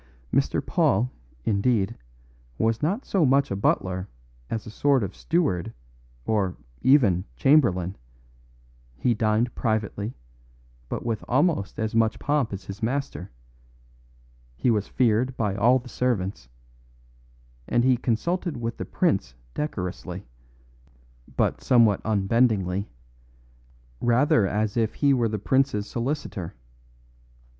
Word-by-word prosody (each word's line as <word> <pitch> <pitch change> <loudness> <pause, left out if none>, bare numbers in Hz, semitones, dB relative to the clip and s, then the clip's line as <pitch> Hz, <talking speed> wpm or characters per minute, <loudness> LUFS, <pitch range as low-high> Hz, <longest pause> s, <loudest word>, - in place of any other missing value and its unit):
Mr. - - +1
Paul, 120 +6 +2 0.3
indeed, 105 0 +1 0.6
was 115 0 +1
not 195 - -1
so 190 -4 +1
much 135 -2 +3
a - - 0
butler 95 -1 0 0.4
as 110 - -3
a 110 - -8
sort 140 +1 +2
of 95 - -5
steward 155 - 0 0.5
or, 100 -5 0 0.2
even, 115 -11 +4
chamberlain; 100 - +3 1.0
he 125 - +2
dined 110 +2 +1
privately, 110 0 -2 0.7
but - - -4
with 115 -2 -2
almost 130 - +1
as 110 0 -2
much 115 -1 +2
pomp 145 -5 0
as 100 -2 -6
his 100 +3 -8
master; 130 -5 -2 1.3
he 120 - +2
was 105 -3 0
feared 125 +1 +1
by 105 -4 0
all 115 +6 +4
the 125 0 -8
servants; 100 - -2 1.2
and 120 0 +2
he 130 0 +4
consulted 145 +7 -1
with 115 0 -4
the - - -4
prince 60 - 0 0.2
decorously, 90 -8 -4 1.1
but - - +1
somewhat 115 -6 +4
unbendingly 100 -2 +1 1.1
rather 120 -3 +3
as 105 +1 -1
if 110 -2 +1
he 140 -1 +3
were 120 -3 +2
the 105 - -2
prince's 120 -1 +1
solicitor. 120 - -4
115 Hz, 115 wpm, -25 LUFS, 100-130 Hz, 1.3 s, even